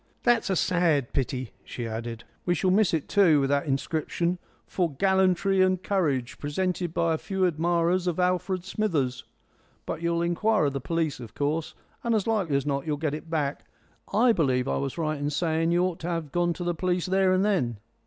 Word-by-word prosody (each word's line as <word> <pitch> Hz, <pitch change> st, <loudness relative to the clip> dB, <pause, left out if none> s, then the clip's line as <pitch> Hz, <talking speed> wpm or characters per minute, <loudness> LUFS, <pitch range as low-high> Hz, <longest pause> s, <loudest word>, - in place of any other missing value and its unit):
"That's 240 Hz, -4 st, +3 dB
a 190 Hz, -, +2 dB
sad 165 Hz, -8 st, +1 dB
pity," 130 Hz, -2 st, -2 dB
she 120 Hz, -, -6 dB
added; 115 Hz, +1 st, -5 dB, 0.2 s
"we 175 Hz, -, +1 dB
shall 185 Hz, +4 st, +1 dB
miss 205 Hz, 0 st, +3 dB
it 160 Hz, -4 st, -1 dB
too, 175 Hz, -7 st, +5 dB
with 135 Hz, 0 st, 0 dB
that 140 Hz, +1 st, +1 dB
inscription, 160 Hz, +5 st, -1 dB, 0.3 s
'For 175 Hz, -4 st, -1 dB
Gallantry 190 Hz, +2 st, +3 dB
and 185 Hz, 0 st, +2 dB
Courage; 145 Hz, -12 st, -1 dB
Presented 175 Hz, +3 st, -2 dB
by 165 Hz, 0 st, +1 dB
a 160 Hz, -, -2 dB
Few 190 Hz, -1 st, -1 dB
Admirers 175 Hz, +2 st, +1 dB
of 175 Hz, 0 st, -1 dB
Alfred 180 Hz, 0 st, 0 dB
Smithers.' 150 Hz, -12 st, -1 dB, 0.6 s
But -, -, -4 dB
you'll 170 Hz, 0 st, 0 dB
inquire 200 Hz, +3 st, +2 dB
of 140 Hz, -, 0 dB
the 140 Hz, -, -3 dB
police, 160 Hz, -1 st, -1 dB
of 115 Hz, -3 st, -10 dB
course, 150 Hz, +3 st, -2 dB, 0.3 s
and 235 Hz, -1 st, +1 dB
as 210 Hz, -, 0 dB
likely 200 Hz, -10 st, 0 dB
as 140 Hz, -, -2 dB
not 140 Hz, 0 st, -2 dB
you'll 150 Hz, -1 st, 0 dB
get 150 Hz, -1 st, -1 dB
it 155 Hz, +2 st, -7 dB
back. 150 Hz, -3 st, -2 dB, 0.5 s
I 235 Hz, +3 st, +4 dB
believe 130 Hz, -, +1 dB
I -, -, 0 dB
was 140 Hz, +2 st, -3 dB
right 155 Hz, -2 st, -1 dB
in 145 Hz, 0 st, -1 dB
saying 160 Hz, +2 st, 0 dB
you 175 Hz, +1 st, +3 dB
ought 180 Hz, -2 st, -1 dB
to 170 Hz, -, -5 dB
have 165 Hz, -4 st, -3 dB
gone 175 Hz, +1 st, +1 dB
to 175 Hz, -, -6 dB
the 175 Hz, 0 st, 0 dB
police 180 Hz, +1 st, -1 dB
there 190 Hz, 0 st, +2 dB
and 185 Hz, +2 st, +3 dB
then." 130 Hz, -, 0 dB
170 Hz, 205 wpm, -26 LUFS, 145-185 Hz, 0.6 s, too